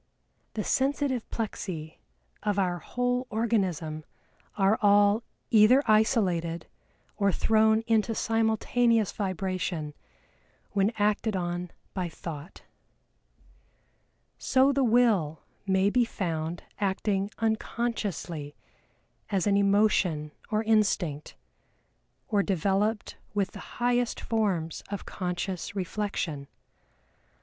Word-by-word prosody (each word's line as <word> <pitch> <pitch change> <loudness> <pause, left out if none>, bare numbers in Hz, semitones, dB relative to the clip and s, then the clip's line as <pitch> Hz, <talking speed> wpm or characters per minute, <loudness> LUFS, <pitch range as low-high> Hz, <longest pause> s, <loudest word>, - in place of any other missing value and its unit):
"The 215 - -1
sensitive 270 -1 0
plexi 180 -8 -5 0.4
of 205 -1 -1
our 180 -3 +1
whole 245 +5 -1
organism 185 -9 -1 0.5
are 200 +2 +3
all 205 +1 +5 0.3
either 230 +5 +6
isolated 190 -7 +2 0.5
or 200 -2 +3
thrown 220 +3 +3
into 225 0 +1
simultaneous 225 0 +2
vibration 185 -5 -3 0.8
when 200 +1 +2
acted 210 0 +1
on 175 -1 -2 0.2
by 180 -3 -2
Thought." 165 +1 -8 1.8
So 265 +1 +4
the 275 0 +2
Will 220 -10 +2 0.2
may 190 +1 +3
be 250 +1 +4
found 170 -6 -3 0.2
acting 195 0 0
unconsciously 215 -9 -2 0.7
as 195 -4 0
an 205 -1 +3
emotion 200 -6 +2 0.2
or 215 0 +1
instinct, 200 -9 +1 0.9
or 205 -2 +2
developed 200 +3 0 0.2
with 200 -2 0
the - - -11
highest 245 0 +1
forms 190 -8 -1
of 200 -2 -5
conscious 180 +1 -4
reflection. 180 -6 -3
200 Hz, 95 wpm, -28 LUFS, 180-225 Hz, 1.8 s, either